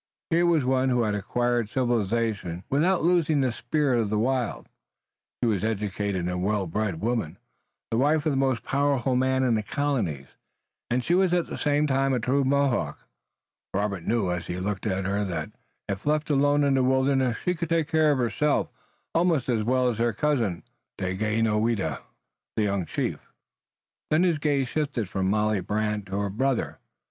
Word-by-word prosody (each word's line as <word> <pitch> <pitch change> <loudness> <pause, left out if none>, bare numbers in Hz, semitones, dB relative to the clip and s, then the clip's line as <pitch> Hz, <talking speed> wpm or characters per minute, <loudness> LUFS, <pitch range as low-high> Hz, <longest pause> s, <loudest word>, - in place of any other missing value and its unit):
Here 170 +1 +3
was 160 -6 +3
one 130 0 +2
who 125 -2 +2
had 105 -2 0
acquired 120 +2 0
civilization 115 -7 -1
without 165 +6 +2
losing 165 -4 +3
the 130 -2 +1
spirit 125 +2 0
of 105 - -2
the 105 - 0
wild. 125 +1 -1 0.8
She - - +3
was 105 -4 0
an 110 - +2
educated 100 -3 -2
and 90 0 -2
well 100 0 0
bred 95 0 -2
woman, 115 -7 -1 0.5
the 115 - +1
wife 150 +3 +2
of 155 - +2
the - - -1
most 130 -4 +1
powerful 135 -2 +1
man 130 +1 +2
in 125 -2 +2
the 110 - +1
colonies, 110 - -2 0.6
and 125 +1 0
she 170 - +1
was 180 -1 +3
at 175 - +1
the - - -6
same 145 0 +1
time 135 -1 +1
a 125 - +1
true 135 +5 +1
Mohawk. 140 -1 0 0.7
Robert 100 -2 -1
knew 105 -3 0
as 90 -2 -3
he 90 +1 -4
looked 100 +2 -3
at 95 -1 -1
her 100 +2 0
that 90 -4 -4 0.4
if 100 +6 -4
left 155 0 +1
alone 145 +1 +3
in 140 -1 +3
the 130 -1 +3
wilderness 130 -1 +2
she 180 - -1
could 170 -2 -4
take 165 -2 +1
care 160 -2 +3
of 145 - +1
herself 130 +5 +1 0.4
almost 165 -6 +2
as 115 -3 +1
well 130 +2 +2
as 115 -3 -1
her 120 -1 +1
cousin, 120 - 0 0.3
Daganoweda, 105 - 0 0.6
the 110 - +2
young 100 -4 -1
chief. - - -2 0.9
Then 155 +3 +3
his 170 -5 +2
gaze 145 -3 +1
shifted 140 -7 -2
from 95 +1 -1
Molly 105 0 +1
Brant 105 -1 -2
to 95 +1 -3
her 100 -1 -2
brother. 130 +4 -1
120 Hz, 180 wpm, -26 LUFS, 105-140 Hz, 0.9 s, Here